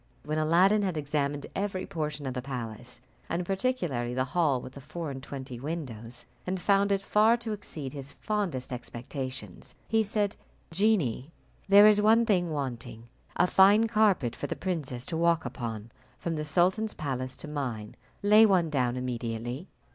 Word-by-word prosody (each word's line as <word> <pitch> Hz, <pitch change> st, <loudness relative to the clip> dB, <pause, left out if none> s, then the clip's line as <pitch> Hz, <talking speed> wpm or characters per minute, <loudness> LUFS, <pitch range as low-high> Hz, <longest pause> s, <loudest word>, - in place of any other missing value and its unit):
When 155 Hz, +1 st, -1 dB
Aladdin 180 Hz, +7 st, +4 dB
had 185 Hz, -5 st, -1 dB
examined 145 Hz, -1 st, -1 dB
every 195 Hz, -1 st, -2 dB
portion 150 Hz, -3 st, -4 dB
of 130 Hz, -, -2 dB
the 125 Hz, -, -3 dB
palace, 120 Hz, -2 st, -6 dB, 0.3 s
and 175 Hz, +1 st, -1 dB
particularly 175 Hz, -, -1 dB
the 130 Hz, -, +2 dB
hall 140 Hz, -1 st, +1 dB
with 130 Hz, -, -9 dB
the 140 Hz, -, -10 dB
four 155 Hz, +2 st, -5 dB
and 135 Hz, -1 st, -7 dB
twenty 130 Hz, -3 st, -7 dB
windows, 125 Hz, -6 st, -6 dB, 0.2 s
and 185 Hz, +1 st, -1 dB
found 200 Hz, +2 st, +3 dB
it 195 Hz, 0 st, +1 dB
far 215 Hz, +4 st, +4 dB
to 235 Hz, -2 st, -5 dB
exceed 155 Hz, -10 st, -6 dB
his 140 Hz, -1 st, -7 dB
fondest 175 Hz, -, -3 dB
expectations, 130 Hz, +3 st, -6 dB
he 225 Hz, 0 st, +3 dB
said, 205 Hz, -1 st, 0 dB, 0.4 s
"Genie, 165 Hz, -, +1 dB, 0.4 s
there 200 Hz, +1 st, +9 dB
is 210 Hz, -1 st, +6 dB
one 225 Hz, +2 st, +5 dB
thing 180 Hz, -6 st, +2 dB
wanting, 120 Hz, -5 st, -5 dB, 0.3 s
a -, -, +4 dB
fine 200 Hz, +5 st, +6 dB
carpet 210 Hz, -, +2 dB
for -, -, -4 dB
the -, -, -3 dB
princess 145 Hz, -10 st, -3 dB
to 170 Hz, -, -3 dB
walk 170 Hz, -1 st, +2 dB
upon 115 Hz, -2 st, -5 dB, 0.3 s
from 170 Hz, -, -3 dB
the 150 Hz, 0 st, -3 dB
sultan's 185 Hz, +7 st, +2 dB
palace 130 Hz, -3 st, -3 dB
to -, -, -7 dB
mine. 125 Hz, -8 st, -4 dB, 0.3 s
Lay 210 Hz, +2 st, +7 dB
one 185 Hz, -7 st, +4 dB
down 125 Hz, -3 st, +1 dB
immediately." 120 Hz, -, -4 dB
155 Hz, 165 wpm, -29 LUFS, 130-195 Hz, 0.4 s, there